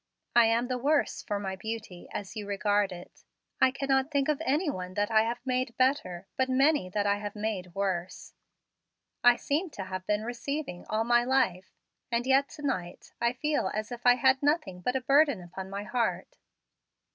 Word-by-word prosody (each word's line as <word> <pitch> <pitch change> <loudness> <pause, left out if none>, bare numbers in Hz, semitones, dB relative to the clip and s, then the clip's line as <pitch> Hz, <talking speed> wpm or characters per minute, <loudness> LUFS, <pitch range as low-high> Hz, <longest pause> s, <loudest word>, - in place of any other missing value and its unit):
I 240 -1 +7
am 230 +2 +2
the 250 0 -2
worse 285 +3 +1
for 205 - -3
my 190 -1 -3
beauty, 215 -2 -6
as 200 +1 -6
you 210 -2 -5
regard 205 0 +1
it. 175 0 -11 0.4
I - - +7
cannot 270 0 0
think 280 -1 +1
of 300 - 0
any 300 +7 +1
one 185 -8 -4
that 205 +1 0
I 220 0 +5
have 235 +1 -2
made 255 -2 -1
better; 225 -9 +1
but 260 0 +1
many 270 -5 +3
that 205 +2 -1
I 200 0 +2
have 205 0 -6
made 205 -5 -4
worse. 190 -2 -3 0.9
I 245 0 +7
seem 310 +8 -1
to 195 - -3
have 185 0 -6
been 210 0 +1
receiving 245 -5 -4
all 215 +1 +1
my 240 +1 +3
life, 215 -8 +1 0.4
and 235 +1 0
yet 270 +1 +3
to 300 - -11
night 180 -11 -4
I 235 +1 +2
feel 295 -6 0
as 215 +2 -3
if 240 0 -7
I 245 - +8
had 260 +2 +3
nothing 290 - 0
but 250 +8 -1
a 265 - +1
burden 280 -2 +4
upon 185 +2 -8
my 200 +1 -4
heart." 240 - -2
235 Hz, 190 wpm, -29 LUFS, 195-265 Hz, 0.9 s, I